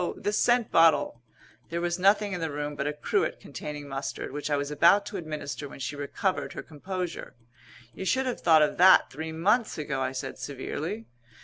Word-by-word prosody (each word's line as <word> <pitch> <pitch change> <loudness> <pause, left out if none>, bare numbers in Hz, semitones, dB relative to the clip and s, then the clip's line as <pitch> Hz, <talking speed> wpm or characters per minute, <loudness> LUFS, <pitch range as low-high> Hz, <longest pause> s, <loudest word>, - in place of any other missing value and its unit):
The 205 - -2
scent 240 +1 +2
bottle!" 155 -7 +4 0.5
There 170 - -2
was 175 +1 -1
nothing 200 +2 +3
in 180 - -3
the 160 - -1
room 145 0 -4
but 140 0 -2
a 150 - -1
cruet 150 - -1
containing 145 -1 -7
mustard, 135 -1 -5
which 145 +2 -4
I 145 - +2
was 145 +1 -3
about 170 +7 +5
to 205 - -5
administer 150 -4 -5
when - - -11
she 135 +3 -4
recovered 145 +6 -2
her - - -6
composure. 180 +3 -6 0.6
"You 190 - -6
should 260 +7 +1
have 255 - -3
thought 160 -3 +6
of 150 - 0
that 185 +2 +7
three 160 +3 -5
months 210 +9 +1
ago," 140 -3 -3
I 130 - -1
said 135 0 -5
severely. 155 - -5
160 Hz, 195 wpm, -27 LUFS, 145-190 Hz, 0.6 s, that